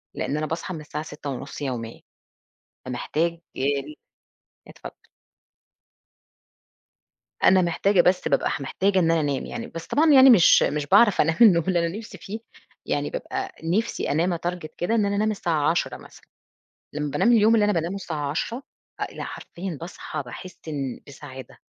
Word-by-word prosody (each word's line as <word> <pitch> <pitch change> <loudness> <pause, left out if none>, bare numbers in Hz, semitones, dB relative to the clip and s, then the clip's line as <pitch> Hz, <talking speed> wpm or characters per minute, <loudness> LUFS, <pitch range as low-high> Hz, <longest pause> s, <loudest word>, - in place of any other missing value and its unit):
لإن 150 - -2
أنا 155 - -1
باصحى 165 +4 -4
من 155 - -6
الساعة 150 0 -6
6:30 140 -2 -7
يوميًا 120 -5 -5 0.9
فمحتاج 155 +6 -1 0.2
آ - - -6 1.1
اتفضل. - - -11 2.5
أنا 185 -1 +6
محتاجة 180 +3 +2
بس 180 +1 +2
بابقى - - +1
محتاجة 190 +8 0
إن 165 -3 +3
أنا 165 -1 +3
أنام، 145 -3 -1
يعني 235 -1 -6
بس 165 -5 -8
طبعًا 310 +1 +3
يعني 265 -1 +9
مش 200 -9 +7
مش 150 -1 0
باعرف 205 +4 +5
أنام 160 +1 +2
النوم 180 -8 +6
اللي 175 -2 +2
أنا 170 +5 -4
نفسي 210 -3 -10
فيه 200 +5 -6 0.5
يعني - - -1
بابقى 390 -6 -4
نفسي 205 +8 -1
أنام 170 +4 +1
أtarget 175 -1 -4
كده 215 +6 0
إن 215 -3 +2
أنا 200 0 -1
أنام 215 +1 +1
الساعة 160 -7 0
22:00 175 +1 -1
مثلًا - - -16 0.7
لما 150 0 -3
بانام 145 - +3
اليوم 225 0 +5
اللي 215 - +4
أنا 210 - +2
بانامه 170 +1 -1
الساعة 155 -7 -4
22:00 230 - -3 0.4
آآ، - - +1
لأ - - -7
حرفيًا 175 -3 -7
باصحى 165 -3 -6
باحس 160 +9 -10
إن 140 -4 -4
بسعادة 135 -2 -11
170 Hz, 160 wpm, -24 LUFS, 150-200 Hz, 2.5 s, يعني